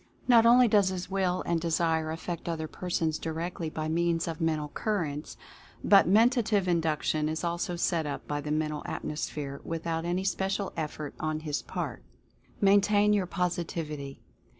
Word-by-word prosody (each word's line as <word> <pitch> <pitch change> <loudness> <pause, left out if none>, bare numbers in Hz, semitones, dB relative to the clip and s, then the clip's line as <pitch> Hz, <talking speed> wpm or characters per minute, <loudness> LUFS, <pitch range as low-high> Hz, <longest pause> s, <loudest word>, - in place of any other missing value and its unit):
Not 230 -2 +6
only 245 +1 +7
does 205 -3 +4
his 185 0 -5
Will 185 -2 0
and 170 -1 0
Desire 165 -1 +1
affect 170 +1 -5
other 160 -1 -3
persons 165 -2 -2
directly 165 +1 -4
by 155 0 -4
means 170 +1 +1
of 165 -1 -4
Men 160 -1 +2
tal 150 -1 -5
Currents, 160 -7 -3 0.5
but 200 -3 +6
Mentative 220 -1 +3
Induction 155 -2 +1
is 160 +2 -3
also 175 +1 -1
set 170 -2 0
up 145 - -5
by 145 0 -2
the 150 - -6
Mental 150 -1 -1
Atmosphere, 145 -2 -4
without 165 0 -3
any 175 +2 -1
special 195 +1 -1
ef 155 -2 -3
fort 150 -2 -6
on 155 0 -2
his 150 -2 -2
part. - - -5 0.6
MAINTAIN 205 +1 +4
YOUR 195 -3 +1
POSITIVITY. 165 -6 -3
170 Hz, 160 wpm, -29 LUFS, 155-190 Hz, 0.6 s, only